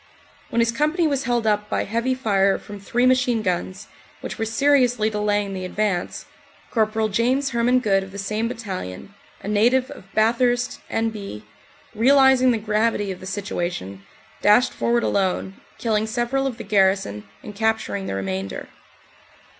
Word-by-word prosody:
When 235 Hz, -, +1 dB
his 230 Hz, 0 st, +2 dB
company 305 Hz, +7 st, +1 dB
was 280 Hz, -4 st, 0 dB
held 240 Hz, -1 st, 0 dB
up 210 Hz, -1 st, +1 dB
by -, -, 0 dB
heavy 235 Hz, +5 st, -1 dB
fire 200 Hz, -6 st, +2 dB
from 205 Hz, -1 st, -10 dB
three 245 Hz, +5 st, 0 dB
machine 250 Hz, -3 st, +2 dB
guns, 185 Hz, +2 st, -3 dB, 0.3 s
which -, -, -6 dB
were 225 Hz, -, 0 dB
seriously 245 Hz, -2 st, +2 dB
delaying 205 Hz, -1 st, 0 dB
the 185 Hz, -1 st, -5 dB
advance, 185 Hz, -1 st, -2 dB, 0.5 s
Cpl. 220 Hz, -1 st, +1 dB
James 255 Hz, +6 st, +1 dB
Herman 240 Hz, +1 st, +3 dB
Good 195 Hz, -4 st, +2 dB
of 190 Hz, 0 st, -9 dB
the 200 Hz, -, -9 dB
same 215 Hz, +3 st, -2 dB
battalion, 200 Hz, -, -6 dB, 0.3 s
a -, -, -6 dB
native 240 Hz, +5 st, +2 dB
of 195 Hz, -, -13 dB
Bathurst, 240 Hz, +2 st, +2 dB
N.B., 210 Hz, -, -3 dB, 0.5 s
realising 265 Hz, +2 st, +5 dB
the 235 Hz, -, +2 dB
gravity 210 Hz, -1 st, 0 dB
of 185 Hz, -, -7 dB
the 185 Hz, -, -9 dB
situation, 175 Hz, -, -4 dB, 0.4 s
dashed 210 Hz, +5 st, +4 dB
forward 235 Hz, 0 st, +1 dB
alone, 190 Hz, 0 st, -1 dB, 0.2 s
killing 220 Hz, -2 st, 0 dB
several 245 Hz, +4 st, -1 dB
of 250 Hz, -4 st, -4 dB
the 230 Hz, -, -7 dB
garrison 190 Hz, -, +1 dB
and 210 Hz, -, -8 dB
capturing 220 Hz, -2 st, -1 dB
the -, -, -3 dB
remainder. 95 Hz, 0 st, -4 dB
220 Hz, 155 wpm, -22 LUFS, 195-240 Hz, 0.5 s, realising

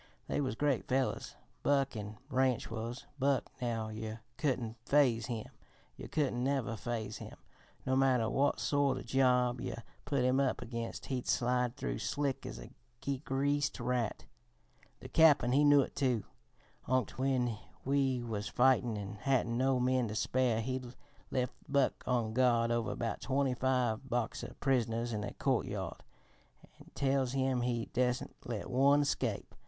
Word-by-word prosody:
They -, -, 0 dB
was 130 Hz, -4 st, -1 dB
great 140 Hz, -2 st, 0 dB
fellers, 130 Hz, 0 st, -1 dB, 0.3 s
Buck 140 Hz, -2 st, +2 dB
an' 105 Hz, 0 st, -6 dB
Ranch 130 Hz, -4 st, +1 dB
was. 115 Hz, +3 st, -5 dB
Buck, 135 Hz, -1 st, +1 dB
now 115 Hz, -3 st, -1 dB
yer 110 Hz, +1 st, -6 dB
couldn't 120 Hz, -6 st, -1 dB
phase 125 Hz, -5 st, +3 dB
him, 115 Hz, -3 st, -3 dB, 0.5 s
yer -, -, -8 dB
couldn't 130 Hz, -5 st, 0 dB
never 130 Hz, -5 st, 0 dB
phase 115 Hz, -1 st, -4 dB
him, -, -, -9 dB, 0.5 s
no 130 Hz, -, +1 dB
matter 130 Hz, -4 st, +3 dB
what 140 Hz, +5 st, +1 dB
sort 140 Hz, -2 st, +2 dB
o' 130 Hz, -, -6 dB
job 125 Hz, -1 st, +2 dB
yer 115 Hz, -, -5 dB, 0.2 s
put 140 Hz, -3 st, +1 dB
him 130 Hz, +1 st, +3 dB
up 135 Hz, -2 st, +1 dB
against 115 Hz, -1 st, -5 dB
he'd 130 Hz, -2 st, -3 dB
slide 125 Hz, 0 st, +1 dB
through -, -, -3 dB
slick 140 Hz, -2 st, -2 dB
as -, -, -7 dB
a -, -, -10 dB, 0.5 s
greased 145 Hz, +1 st, 0 dB
rat. 120 Hz, -2 st, -1 dB, 0.8 s
The -, -, -8 dB
Cap'n, 150 Hz, -6 st, +5 dB
he 140 Hz, +3 st, +4 dB
knew 145 Hz, -1 st, +7 dB
it, -, -, -4 dB
too. 125 Hz, -6 st, +1 dB, 0.6 s
Onct 130 Hz, 0 st, 0 dB
when 125 Hz, -4 st, +1 dB, 0.3 s
we 135 Hz, -2 st, +1 dB
was 105 Hz, -3 st, -3 dB
fightin' 125 Hz, -3 st, +3 dB
an' 100 Hz, +1 st, -6 dB
hadn't 125 Hz, -2 st, +1 dB
no 130 Hz, +1 st, +2 dB
men 125 Hz, -1 st, +2 dB
to 105 Hz, -, -5 dB
spare, 120 Hz, -1 st, +1 dB
he 130 Hz, +2 st, -2 dB, 0.5 s
lef' 125 Hz, -1 st, -1 dB, 0.2 s
Buck 140 Hz, -1 st, +1 dB
on 120 Hz, -3 st, +1 dB
guard 120 Hz, -2 st, +3 dB
over 120 Hz, -1 st, 0 dB
about 115 Hz, -, -3 dB
twenty 135 Hz, 0 st, +1 dB
five 125 Hz, -1 st, 0 dB
Boxer 120 Hz, -1 st, -2 dB
prisoners 120 Hz, -3 st, +1 dB
in 105 Hz, -1 st, -2 dB
a -, -, -5 dB
courtyard -, -, -1 dB, 0.8 s
an' -, -, -15 dB
tells 135 Hz, -2 st, +1 dB
him 130 Hz, -2 st, +1 dB
he 120 Hz, -1 st, -1 dB
dassent 125 Hz, 0 st, 0 dB
let 115 Hz, -4 st, -4 dB
one 135 Hz, +3 st, +4 dB
escape. 145 Hz, -, -2 dB
125 Hz, 155 wpm, -33 LUFS, 115-135 Hz, 0.8 s, knew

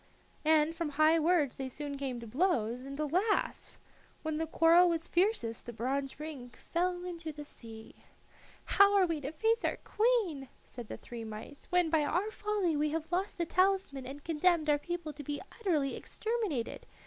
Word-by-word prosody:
And 315 Hz, +1 st, +4 dB
from 335 Hz, -2 st, -2 dB
high 310 Hz, +3 st, +4 dB
words 315 Hz, -4 st, +2 dB
they 265 Hz, -1 st, -4 dB
soon 290 Hz, +2 st, -5 dB
came 270 Hz, -3 st, -3 dB
to -, -, -7 dB
blows, 250 Hz, -, 0 dB
and, 275 Hz, +1 st, -7 dB
alas! 365 Hz, +8 st, 0 dB, 0.5 s
when 315 Hz, -1 st, -1 dB
the 320 Hz, +1 st, -1 dB
quarrel 335 Hz, +3 st, +6 dB
was 330 Hz, -1 st, -1 dB
fiercest 345 Hz, -, 0 dB
the 240 Hz, -, -5 dB
bronze 270 Hz, +5 st, -2 dB
ring 295 Hz, -5 st, -7 dB
fell 355 Hz, +7 st, -2 dB
into 335 Hz, -3 st, -5 dB
the 295 Hz, 0 st, -9 dB
sea. 225 Hz, -5 st, -11 dB, 0.7 s
"How 400 Hz, 0 st, +5 dB
are 380 Hz, -, +5 dB
we 330 Hz, -4 st, -2 dB
to 275 Hz, +1 st, -4 dB
face 450 Hz, +7 st, +1 dB
our -, -, 0 dB
queen," 420 Hz, -, +1 dB, 0.2 s
said 240 Hz, -3 st, -9 dB
the -, -, -6 dB
three 235 Hz, -1 st, -8 dB
mice 220 Hz, +6 st, -9 dB
"when 360 Hz, -3 st, +3 dB
by 315 Hz, -2 st, +3 dB
our 360 Hz, +8 st, 0 dB
folly 415 Hz, -6 st, 0 dB
we 300 Hz, +1 st, +1 dB
have 320 Hz, +2 st, -3 dB
lost 375 Hz, +3 st, -1 dB
the 340 Hz, -, 0 dB
talisman 370 Hz, -7 st, +1 dB
and 280 Hz, +2 st, -8 dB
condemned 325 Hz, -1 st, +2 dB
our 290 Hz, -, +3 dB
people 345 Hz, -1 st, -4 dB
to 290 Hz, +1 st, -8 dB
be 290 Hz, +1 st, -3 dB, 0.2 s
utterly 310 Hz, -11 st, +1 dB
exterminated? 435 Hz, -, -3 dB
315 Hz, 180 wpm, -32 LUFS, 275-360 Hz, 0.7 s, quarrel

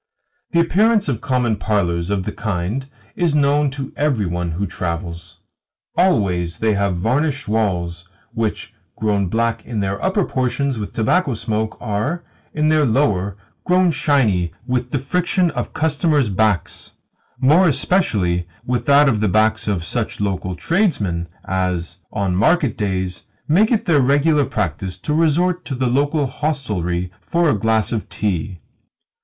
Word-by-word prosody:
The 170 Hz, -, +1 dB
appearance 210 Hz, +5 st, +3 dB
of 120 Hz, -5 st, -2 dB
common 125 Hz, -5 st, 0 dB
parlours 90 Hz, -5 st, 0 dB
of 100 Hz, -2 st, 0 dB
the -, -, -3 dB
kind 110 Hz, +7 st, -3 dB, 0.3 s
is 170 Hz, -4 st, +1 dB
known 145 Hz, 0 st, +3 dB
to 135 Hz, 0 st, -6 dB
every 140 Hz, -8 st, +1 dB
one 90 Hz, 0 st, -2 dB
who 95 Hz, +5 st, -2 dB
travels. 85 Hz, -1 st, -5 dB, 0.5 s
Always 90 Hz, -, +1 dB
they 110 Hz, -1 st, +1 dB
have 100 Hz, -2 st, 0 dB
varnished 135 Hz, -, 0 dB
walls 90 Hz, -5 st, -1 dB, 0.2 s
which, 115 Hz, -2 st, -3 dB, 0.2 s
grown 105 Hz, -3 st, 0 dB
black 115 Hz, +3 st, 0 dB
in 115 Hz, -3 st, -4 dB
their 100 Hz, 0 st, -2 dB
upper 190 Hz, 0 st, +1 dB
portions 130 Hz, 0 st, -1 dB
with 105 Hz, -2 st, -5 dB
tobacco 135 Hz, +4 st, +1 dB
smoke, 110 Hz, 0 st, -2 dB
are, 120 Hz, +10 st, -2 dB, 0.3 s
in 155 Hz, 0 st, +1 dB
their 155 Hz, -1 st, +4 dB
lower, 105 Hz, -7 st, +1 dB, 0.3 s
grown 180 Hz, -1 st, +3 dB
shiny 125 Hz, -, +1 dB
with 125 Hz, -1 st, -1 dB
the 140 Hz, -, -1 dB
friction 175 Hz, +5 st, +1 dB
of -, -, -4 dB
customers' 150 Hz, -4 st, +1 dB
backs 105 Hz, -3 st, -1 dB, 0.5 s
more 160 Hz, +8 st, +5 dB
especially 100 Hz, -, +1 dB, 0.2 s
with 125 Hz, -1 st, -2 dB
that 145 Hz, +1 st, +6 dB
of 115 Hz, -6 st, +2 dB
the 105 Hz, -1 st, +1 dB
backs 110 Hz, +3 st, +2 dB
of 95 Hz, -5 st, -1 dB
such -, -, -2 dB
local 95 Hz, -2 st, -2 dB
tradesmen 105 Hz, -, 0 dB, 0.2 s
as, 90 Hz, -2 st, -2 dB
on 100 Hz, -4 st, -1 dB
market 140 Hz, -, +2 dB
days, 95 Hz, -3 st, -2 dB, 0.2 s
make 200 Hz, +9 st, +4 dB
it 225 Hz, -, +1 dB
their 155 Hz, -5 st, +4 dB
regular 145 Hz, +2 st, +3 dB
practice 95 Hz, -3 st, -3 dB
to 150 Hz, +11 st, -3 dB
resort 170 Hz, +3 st, +2 dB
to 135 Hz, -, -4 dB
the 130 Hz, +1 st, -1 dB
local 145 Hz, +4 st, +1 dB
hostelry 105 Hz, -, -2 dB
for 170 Hz, -3 st, +1 dB
a 105 Hz, -, 0 dB
glass 110 Hz, 0 st, +1 dB
of 110 Hz, -3 st, -3 dB
tea. 95 Hz, -3 st, -2 dB
115 Hz, 150 wpm, -20 LUFS, 95-150 Hz, 0.5 s, that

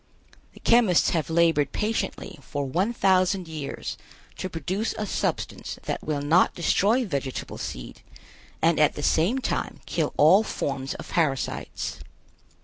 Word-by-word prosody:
The -, -, -15 dB
chemists 230 Hz, -7 st, +4 dB
have 165 Hz, -2 st, -1 dB
labored 160 Hz, -3 st, +3 dB
patiently 210 Hz, -7 st, -2 dB
for 140 Hz, +1 st, -4 dB
one 180 Hz, -, 0 dB
thousand 185 Hz, -4 st, +2 dB
years 155 Hz, -3 st, -5 dB, 0.4 s
to 185 Hz, -, -3 dB
produce 185 Hz, +7 st, -2 dB
a 215 Hz, -, -2 dB
substance -, -, -3 dB
that -, -, -3 dB
will 145 Hz, -2 st, -2 dB
not 160 Hz, +5 st, +4 dB
destroy 210 Hz, +8 st, +2 dB
vegetable 140 Hz, -, -4 dB
seed -, -, -7 dB, 0.6 s
and 165 Hz, -1 st, +4 dB
at 150 Hz, -, +4 dB
the 145 Hz, -, -5 dB
same 175 Hz, -, +2 dB
time 260 Hz, -, -2 dB
kill -, -, -1 dB
all 165 Hz, +8 st, +7 dB
forms 135 Hz, -10 st, -3 dB
of -, -, -8 dB
parasites. 140 Hz, -6 st, -1 dB
170 Hz, 140 wpm, -25 LUFS, 145-195 Hz, 0.6 s, all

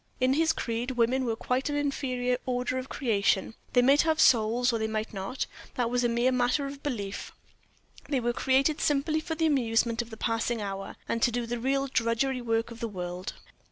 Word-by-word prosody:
In 255 Hz, +1 st, +3 dB
his 320 Hz, +2 st, +3 dB
creed, 235 Hz, -4 st, -2 dB
women 255 Hz, +1 st, +1 dB
were 230 Hz, -2 st, 0 dB
quite 255 Hz, +5 st, -1 dB
an 290 Hz, -, -1 dB
inferior 255 Hz, -3 st, -1 dB
order 250 Hz, +1 st, -1 dB
of 255 Hz, -, -7 dB
creation 200 Hz, -5 st, +1 dB, 0.2 s
they 245 Hz, -, +5 dB
might 275 Hz, +3 st, +6 dB
have 320 Hz, -1 st, +1 dB
souls 235 Hz, 0 st, +4 dB
or 230 Hz, -, 0 dB
they 220 Hz, -, 0 dB
might 220 Hz, 0 st, -3 dB
not, 195 Hz, +6 st, -3 dB, 0.3 s
that 240 Hz, -2 st, 0 dB
was 245 Hz, 0 st, +1 dB
a 240 Hz, -, +3 dB
mere 240 Hz, +2 st, +2 dB
matter 250 Hz, +3 st, +1 dB
of 275 Hz, 0 st, -7 dB
belief 205 Hz, -9 st, -4 dB, 0.8 s
they 280 Hz, -3 st, +1 dB
were 240 Hz, 0 st, 0 dB
created 270 Hz, +5 st, +2 dB
simply 300 Hz, +2 st, +1 dB
for 320 Hz, +1 st, -4 dB
the 325 Hz, 0 st, +1 dB
amusement 235 Hz, -5 st, +2 dB
of 235 Hz, -, -9 dB
the 220 Hz, -, -9 dB
passing 230 Hz, +1 st, -1 dB
hour, 195 Hz, -1 st, -5 dB
and 230 Hz, -, -1 dB
to 240 Hz, -, +4 dB
do 240 Hz, 0 st, -2 dB
the 240 Hz, +1 st, -3 dB
real 270 Hz, +3 st, +1 dB
drudgery 250 Hz, +1 st, 0 dB
work 230 Hz, 0 st, 0 dB
of 230 Hz, -, -9 dB
the 230 Hz, -, -2 dB
world. 180 Hz, -2 st, -5 dB
245 Hz, 205 wpm, -28 LUFS, 230-270 Hz, 0.8 s, might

